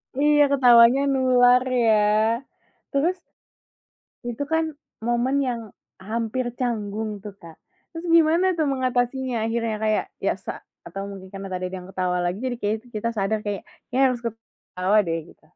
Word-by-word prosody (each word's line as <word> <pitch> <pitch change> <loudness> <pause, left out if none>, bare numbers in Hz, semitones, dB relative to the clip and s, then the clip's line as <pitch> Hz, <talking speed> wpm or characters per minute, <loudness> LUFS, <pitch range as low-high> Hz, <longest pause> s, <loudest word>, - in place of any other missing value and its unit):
Iya 295 +1 +4
ketawanya 245 -1 +6
nular 250 -1 +4 0.2
ya, 215 -1 +5 0.9
terus 340 +7 +1 1.1
itu 240 +4 -3
kan 320 -1 0 0.3
momen 240 +3 +1
yang 240 -2 -2 0.4
hampir 230 +4 -2
canggung 215 -3 -3
tuh 205 -2 -8
Kak, 165 -1 -13 0.4
terus 330 +2 -7
gimana 335 +2 +4
tuh 315 -4 0
mengatasinya 255 -2 -1
akhirnya 225 -1 -1
kayak 215 -1 +1 0.2
biasa - - -3 0.2
atau 195 +1 -6
mungkin 190 -1 -10
karena 195 0 -7
tadi 185 0 -3
ada - - -3
yang 180 - -12
ketawa 180 -1 -1
lagi 175 +2 -1
jadi 255 -1 -2
kayaknya 215 +2 0
tuh 245 - -19
kita 230 +2 -1
sadar 205 +2 0
kayak 205 -2 -4 0.2
kayaknya 250 - -3
kita 270 0 +5
harus 240 - -7
ketawa 215 -3 -2
deh 165 -2 -2 0.2
gitu. - - -31
235 Hz, 155 wpm, -24 LUFS, 205-260 Hz, 1.1 s, ketawanya